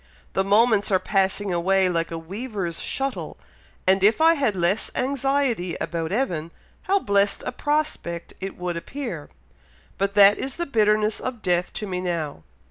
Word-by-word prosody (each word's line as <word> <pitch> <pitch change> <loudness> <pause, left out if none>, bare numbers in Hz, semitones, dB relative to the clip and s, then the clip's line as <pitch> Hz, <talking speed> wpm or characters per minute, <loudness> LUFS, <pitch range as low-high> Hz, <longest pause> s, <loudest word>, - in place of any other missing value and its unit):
The 190 - +1
moments 210 +1 +3
are 190 - +4
passing 195 0 0
away 190 +2 +2
like 170 -2 0
a 165 - -4
weaver's 190 0 -5
shuttle; 270 0 -3 0.5
and 190 +1 +3
if 215 +6 +4
I 325 +1 +6
had 270 -10 0
less 180 +4 +1
anxiety 265 -8 0
about 165 -1 -3
Evan, 180 -9 -1 0.3
how 395 +1 +2
blessed 200 - +1
a - - -2
prospect 295 - -2
it 195 +1 -5
would 180 -1 -3
appear; 210 - -6 0.7
but 200 +1 0
that 205 0 +7
is 270 0 -3
the 345 - -2
bitterness 215 -4 +2
of 250 -4 -5
death 180 -1 +1
to 215 - -4
me 185 -2 -3
now. 165 - -3
200 Hz, 160 wpm, -24 LUFS, 180-245 Hz, 0.7 s, that